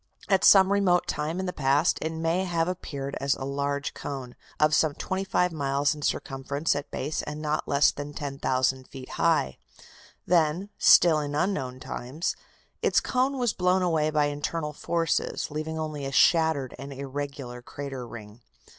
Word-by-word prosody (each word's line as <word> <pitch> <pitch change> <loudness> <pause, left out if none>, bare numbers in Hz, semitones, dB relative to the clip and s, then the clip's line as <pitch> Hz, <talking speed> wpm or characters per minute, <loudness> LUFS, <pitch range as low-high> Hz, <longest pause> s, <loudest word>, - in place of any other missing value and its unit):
At 195 -2 +3
some 195 -1 +7
remote 185 -3 +3
time 155 +4 -2
in 190 - -2
the 180 - -3
past 145 +4 +2
it 160 - -2
may 165 +3 0
have 170 -2 0
appeared 140 -6 -4
as 140 0 +2
a - - -7
large 140 +1 -2
cone, 130 -3 -6 0.2
of 150 0 +4
some 150 -1 +3
twenty 190 +1 -3
five 180 -2 +1
miles 140 -2 0
in 150 - -10
circumference 140 +2 -1
at 145 - -4
base 150 +4 -3
and 150 0 -6
not 155 0 -2
less 140 +1 +4
than 145 0 -7
10,000 130 -2 -1
feet 130 -1 -10
high. 65 - +1 0.7
Then, 170 +3 +2
still 165 -3 +6
in 145 -1 -3
unknown 135 -7 -1
times, 130 +6 -4 0.5
its - - +3
cone 260 +2 0
was 245 -4 +1
blown 180 +1 +2
away 160 -3 +2
by 150 -1 +2
internal 150 +2 -3
forces, 165 0 -1
leaving 155 +1 -4
only 155 -3 -4
a 135 - -3
shattered 160 -3 +3
and 140 +1 -7
irregular 135 -2 -6
crater 135 -1 -7
ring. 110 0 -11
150 Hz, 165 wpm, -27 LUFS, 140-165 Hz, 0.7 s, some